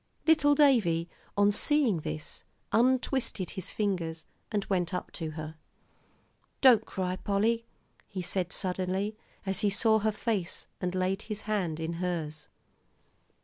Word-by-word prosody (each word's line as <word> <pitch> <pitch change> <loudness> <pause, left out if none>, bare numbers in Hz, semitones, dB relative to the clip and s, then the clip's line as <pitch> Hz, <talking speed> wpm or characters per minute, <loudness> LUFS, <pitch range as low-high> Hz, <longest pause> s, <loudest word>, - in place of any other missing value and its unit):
Little 300 -3 +5
Davie, 210 - +4 0.3
on 205 0 +5
seeing 260 - +3
this, 155 +1 -6 0.3
untwisted 250 -4 +1
his 190 -2 -6
fingers 170 -6 -2 0.3
and 205 -2 0
went 180 -1 0
up - - -4
to 160 -3 -4
her. 155 0 -6 1.0
"Don't 235 -5 +6
cry, 185 -1 -2
Polly," 225 +4 +1 0.4
he 190 -3 -5
said 180 0 -2
suddenly, 190 +3 -1 0.3
as 190 -1 -1
he 210 - +2
saw 220 +2 +3
her 215 +1 +1
face, 210 -5 -2 0.2
and 180 0 -1
laid 185 +2 0
his 215 -2 -5
hand 190 -8 -1
in 160 +1 -2
hers. 155 -4 -3
195 Hz, 135 wpm, -30 LUFS, 175-220 Hz, 1.0 s, Don't